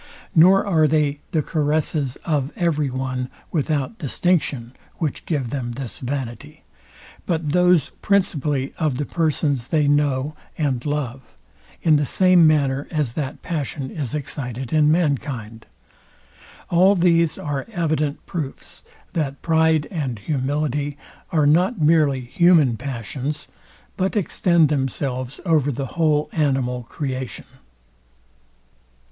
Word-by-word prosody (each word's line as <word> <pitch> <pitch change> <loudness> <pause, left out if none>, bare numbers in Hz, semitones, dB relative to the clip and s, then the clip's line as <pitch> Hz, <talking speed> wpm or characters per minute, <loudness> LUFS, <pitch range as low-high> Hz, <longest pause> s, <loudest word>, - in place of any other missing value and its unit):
Nor 185 +5 +6
are 160 -6 +3
they 150 -1 +1
the 155 -3 0
caresses 150 -3 0
of 145 -3 0
every 160 -7 0
one 130 0 -3 0.2
without 155 - -1
distinction, 145 -6 0 0.2
which 155 -4 -3
give 140 -8 -1
them 125 -4 -3
this 125 -1 -7
vanity, 125 -3 -5 0.6
but 160 -3 -1
those 180 -3 +3
principally 150 -9 0
of 150 -6 0
the 145 - -2
persons 145 -6 0
they 155 -3 +2
know 145 0 +1 0.2
and 135 -6 -1
love; 135 -4 -4 0.5
in 155 -2 +5
the 145 - +1
same 185 -3 +5
manner 140 -3 +1
as 150 -8 -1
that 140 -1 -4
passion 145 -4 -3
is 145 -3 -4
excited 130 -3 -5
in 155 -1 +4
mankind. 135 -9 -1 1.0
All 185 +4 +5
these 170 -3 +3
are 145 -2 -4
evident 155 -6 -1
proofs, 155 -7 -6 0.3
that 140 -4 -2
pride 160 -2 +3
and 140 - -3
humility 145 +3 -2 0.3
are 155 -3 +3
not 180 +9 +3
merely 150 -4 +3
human 155 -1 +4
passions, 135 +3 -4 0.5
but 190 +2 0
extend 170 -5 +3
themselves 135 -2 -2
over 155 -5 +2
the 135 +1 -3
whole 155 -3 +2
animal 135 -5 0
creation. 130 -5 -4
145 Hz, 120 wpm, -22 LUFS, 135-160 Hz, 1.0 s, Nor